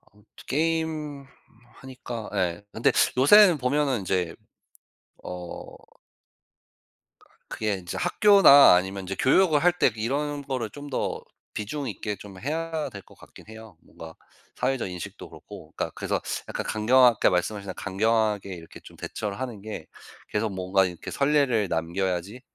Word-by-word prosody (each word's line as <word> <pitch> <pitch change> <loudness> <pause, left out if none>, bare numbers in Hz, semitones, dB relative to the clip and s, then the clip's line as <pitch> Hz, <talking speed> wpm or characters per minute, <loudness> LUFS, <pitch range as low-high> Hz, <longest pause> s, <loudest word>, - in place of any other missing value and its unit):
아무튼 105 +1 -26 0.2
게임 155 -1 -2 0.6
하니까 125 -4 -8
예 90 -1 -1
근데 115 - +2 0.3
요새는 180 +5 +7
보면은 135 -1 0
인제 90 -3 -1 0.9
어 90 -1 -8 1.7
그게 110 -2 -2
인제 90 -1 -7
학교나 175 - +7
아니면 95 +2 -1
인제 95 +1 -5
교육을 155 - +3
할 180 - +6
때 - - +4
이런 145 +6 -2
거를 130 -5 -3
좀 145 +5 -10
더 130 - -2 0.3
비중 135 +7 -4
있게 105 -1 -4
좀 100 0 -12
해야 160 +4 -3
될 100 - -10
것 - - -20
같긴 - - -16
해요. 110 -5 -12
뭔가 80 0 -12 0.4
사회적 125 -4 -1
인식도 90 -1 -8
그렇고 - - -13
그니까 - - -3
그래서 - - -2 0.3
약간 - - -4
강경하게 120 +2 +4
말씀하신다 100 +2 -2
강경하게 105 0 0
이렇게 85 -1 -12
좀 - - -14
대처를 105 0 -5
하는 120 -6 -5
게 105 -6 -7 0.4
계속 110 +1 -1
뭔가 95 +1 +1
이렇게 90 -2 -6
선례를 140 -7 +2
남겨야지 90 +6 -2
110 Hz, 300 characters per minute, -25 LUFS, 95-140 Hz, 1.7 s, 요새는